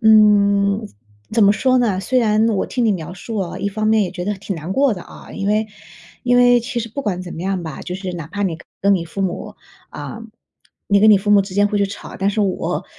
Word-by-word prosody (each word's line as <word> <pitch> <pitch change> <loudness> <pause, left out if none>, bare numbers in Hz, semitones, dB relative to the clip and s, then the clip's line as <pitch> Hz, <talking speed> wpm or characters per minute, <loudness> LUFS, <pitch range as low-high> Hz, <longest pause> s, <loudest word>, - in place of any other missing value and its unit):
嗯， 205 -1 +4 0.5
怎 225 0 +3
么 200 - +6
说 255 +4 +2
呢？ 210 -6 +1
虽 255 +7 +1
然 220 -2 +3
我 200 -3 0
听 245 - -1
你 220 - +3
描 175 -1 -5
述 220 +4 -7
哦， 185 -3 -3
一 - - -2
方 215 +2 -2
面 220 -1 +4
也 185 - -2
觉 180 -1 -5
得 210 - 0
挺 195 0 -5
难 165 +4 -5
过 275 -2 +3
的 180 - -8
啊。 - - -13
因 200 -1 -3
为 215 +1 +1 0.5
因 245 -1 +3
为 245 0 +5
其 240 +1 -4
实 230 0 -6
不 280 - -4
管 185 -6 -2
怎 175 - -8
么 - - -7
样 190 -1 -2
吧， 160 -4 -7
就 180 - -5
是 185 -1 -5
哪 170 -3 -6
怕 200 +5 -4
你 170 -5 -1 0.2
跟 200 +1 +4
你 175 -3 -1
父 195 +4 -4
母 180 -2 -4 0.3
呃， 225 - -7 0.7
你 200 0 +4
跟 215 +1 +7
你 210 - +8
父 205 +2 -2
母 205 -1 +7
之 190 -1 -9
间 205 +1 +4
会 205 0 -1
去 200 - +2
吵。 200 - -9
但 195 - +1
是 215 - -1
我 195 -2 -2
200 Hz, 275 characters per minute, -19 LUFS, 190-220 Hz, 0.7 s, 你